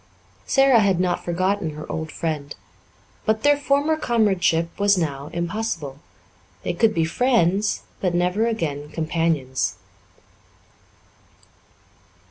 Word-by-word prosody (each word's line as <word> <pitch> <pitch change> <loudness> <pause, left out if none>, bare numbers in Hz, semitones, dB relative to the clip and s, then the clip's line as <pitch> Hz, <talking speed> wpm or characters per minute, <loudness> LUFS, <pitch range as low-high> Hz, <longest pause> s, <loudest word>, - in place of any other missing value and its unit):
Sara 270 -3 +5
had 195 -4 +2
not 180 -1 0
forgotten 185 -1 -1
her 155 - -7
old 160 -1 -4
friend. 150 -3 -4 0.7
But 220 0 0
their 290 0 +5
former 285 +2 +1
comradeship 190 - +1
was 200 -1 +4
now 145 -4 -2
impossible; 170 -5 -3 0.6
they - - -1
could 225 -2 +2
be 165 - +2
friends, 205 0 +1 0.2
but 180 -2 0
never 180 +6 +1
again 150 -10 -3
companions. 155 -5 -1
180 Hz, 105 wpm, -23 LUFS, 160-220 Hz, 0.7 s, Sara